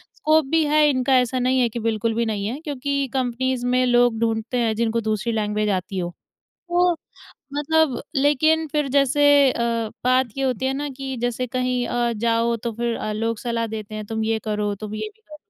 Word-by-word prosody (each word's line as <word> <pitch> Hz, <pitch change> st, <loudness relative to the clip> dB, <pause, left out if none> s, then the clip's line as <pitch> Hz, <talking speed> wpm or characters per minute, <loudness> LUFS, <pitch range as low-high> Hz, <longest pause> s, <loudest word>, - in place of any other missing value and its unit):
Scope 310 Hz, 0 st, +3 dB
भी 325 Hz, -1 st, +4 dB
है 300 Hz, 0 st, +4 dB
इनका 260 Hz, -1 st, +2 dB
ऐसा 250 Hz, +1 st, 0 dB
नहीं 255 Hz, +1 st, +2 dB
है 245 Hz, -2 st, +3 dB
कि 235 Hz, -, -5 dB
बिल्कुल 225 Hz, 0 st, 0 dB
भी 235 Hz, +1 st, +1 dB
नहीं 210 Hz, -3 st, -2 dB
है। 250 Hz, +6 st, -4 dB
क्योंकि 280 Hz, -2 st, -2 dB
कंपनीज़ 255 Hz, -1 st, -1 dB
में 250 Hz, +1 st, +2 dB
लोग 245 Hz, -2 st, +3 dB
ढूँढते 225 Hz, +1 st, -1 dB
हैं 230 Hz, -2 st, +1 dB
जिनको 230 Hz, +1 st, 0 dB
दूसरी 215 Hz, +1 st, -1 dB
लैंग्वेज 210 Hz, -1 st, 0 dB
आती 185 Hz, +2 st, -6 dB
हो। 175 Hz, -1 st, -2 dB, 0.6 s
तो 350 Hz, 0 st, +3 dB, 0.6 s
मतलब 295 Hz, -2 st, +1 dB
लेकिन 310 Hz, +3 st, +3 dB
फ़िर 295 Hz, -2 st, 0 dB
जैसे 280 Hz, +1 st, +2 dB, 0.3 s
अ, 230 Hz, -2 st, -1 dB
बात 255 Hz, 0 st, +3 dB
ये 270 Hz, -, -1 dB
होती 260 Hz, -1 st, -1 dB
है 265 Hz, -, +1 dB
ना 290 Hz, +2 st, -3 dB
कि 270 Hz, -1 st, -5 dB
जैसे 245 Hz, +1 st, -1 dB
कहीं 250 Hz, 0 st, -1 dB
अ, 240 Hz, 0 st, 0 dB
जाओ 230 Hz, +1 st, +1 dB
तो 230 Hz, +1 st, -4 dB
फ़िर 235 Hz, +1 st, -2 dB
अ, 215 Hz, -, -3 dB
लोग 225 Hz, +1 st, -2 dB
सलाह 230 Hz, -1 st, -2 dB
देते 215 Hz, -1 st, -7 dB
हैं 215 Hz, 0 st, -5 dB
तुम 220 Hz, +1 st, -3 dB
ये 220 Hz, 0 st, 0 dB
करो, 210 Hz, -1 st, -1 dB
तुम 215 Hz, +1 st, -7 dB
ये 320 Hz, -, -4 dB
भी 440 Hz, -, -33 dB
करो। 310 Hz, -8 st, -13 dB
245 Hz, 205 wpm, -22 LUFS, 225-270 Hz, 0.6 s, भी